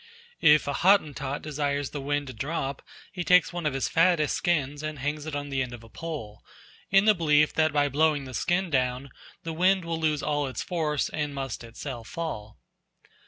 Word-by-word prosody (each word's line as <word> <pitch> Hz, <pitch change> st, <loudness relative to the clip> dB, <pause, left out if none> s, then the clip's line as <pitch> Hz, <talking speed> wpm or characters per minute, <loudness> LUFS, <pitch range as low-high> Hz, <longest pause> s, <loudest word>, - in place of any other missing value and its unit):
If 150 Hz, -1 st, +6 dB
a 145 Hz, -, 0 dB
Hottentot 145 Hz, -7 st, +2 dB
desires 145 Hz, -2 st, -2 dB
the 145 Hz, -, -5 dB
wind 145 Hz, +1 st, -1 dB
to 130 Hz, -, -8 dB
drop, 135 Hz, +2 st, -3 dB, 0.3 s
he 180 Hz, -, -4 dB
takes 180 Hz, +1 st, +4 dB
one 175 Hz, -3 st, -2 dB
of 135 Hz, -, -2 dB
his 135 Hz, -, 0 dB
fattest 165 Hz, -3 st, +3 dB
skins 150 Hz, -4 st, 0 dB
and 155 Hz, -1 st, -4 dB
hangs 145 Hz, +3 st, -3 dB
it 155 Hz, -, -4 dB
on 145 Hz, 0 st, -4 dB
the 135 Hz, -1 st, 0 dB
end 125 Hz, -2 st, -4 dB
of 115 Hz, -, -14 dB
a 115 Hz, -, -14 dB
pole, 125 Hz, -7 st, -7 dB, 0.5 s
in 195 Hz, +1 st, +5 dB
the 215 Hz, -, +7 dB
belief 150 Hz, -4 st, +3 dB
that 155 Hz, 0 st, +2 dB
by 145 Hz, -1 st, +2 dB
blowing 145 Hz, 0 st, +2 dB
the 130 Hz, -, -9 dB
skin 175 Hz, +7 st, 0 dB
down 130 Hz, 0 st, 0 dB, 0.3 s
the 165 Hz, -, -4 dB
wind 185 Hz, +2 st, +2 dB
will 165 Hz, -1 st, -2 dB
lose 155 Hz, -2 st, 0 dB
all 145 Hz, -1 st, 0 dB
its 130 Hz, -, -4 dB
force 155 Hz, -5 st, -1 dB
and 150 Hz, -2 st, -3 dB
must 135 Hz, -4 st, -4 dB
itself 115 Hz, 0 st, -7 dB
fall. 110 Hz, -11 st, -5 dB
150 Hz, 200 wpm, -27 LUFS, 135-160 Hz, 0.5 s, the